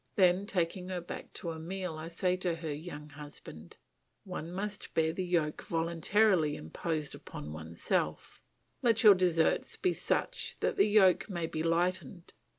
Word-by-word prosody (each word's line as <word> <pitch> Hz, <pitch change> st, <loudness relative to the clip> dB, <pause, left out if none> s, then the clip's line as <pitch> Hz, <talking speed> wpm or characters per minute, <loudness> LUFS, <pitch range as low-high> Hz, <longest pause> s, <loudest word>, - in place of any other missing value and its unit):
Then, 185 Hz, +1 st, +4 dB
taking 180 Hz, -2 st, -1 dB
her 185 Hz, -1 st, -2 dB
back 175 Hz, -, -8 dB
to 170 Hz, -, -4 dB
Emile, 170 Hz, +2 st, -4 dB
I 155 Hz, +1 st, -6 dB
say 180 Hz, +2 st, 0 dB
to 180 Hz, -2 st, 0 dB
her 160 Hz, -2 st, -4 dB
young 150 Hz, -1 st, -8 dB
husband, 145 Hz, -, -10 dB, 0.5 s
"One 175 Hz, -3 st, -6 dB
must 205 Hz, +2 st, -4 dB
bear 160 Hz, 0 st, +2 dB
the 185 Hz, -, -2 dB
yoke 170 Hz, -4 st, 0 dB
voluntarily 170 Hz, 0 st, +2 dB
imposed 155 Hz, -, -3 dB
upon 75 Hz, +1 st, -8 dB
oneself. 80 Hz, -1 st, -2 dB, 0.4 s
Let 230 Hz, -2 st, +3 dB
your 210 Hz, -2 st, +10 dB
deserts 175 Hz, -3 st, +2 dB
be 365 Hz, -2 st, +1 dB
such -, -, -1 dB
that -, -, +1 dB
the 395 Hz, -, +4 dB
yoke 205 Hz, -2 st, +5 dB
may 175 Hz, -4 st, -2 dB
be 155 Hz, -1 st, -3 dB
lightened. 170 Hz, 0 st, -1 dB
170 Hz, 155 wpm, -32 LUFS, 155-185 Hz, 0.5 s, your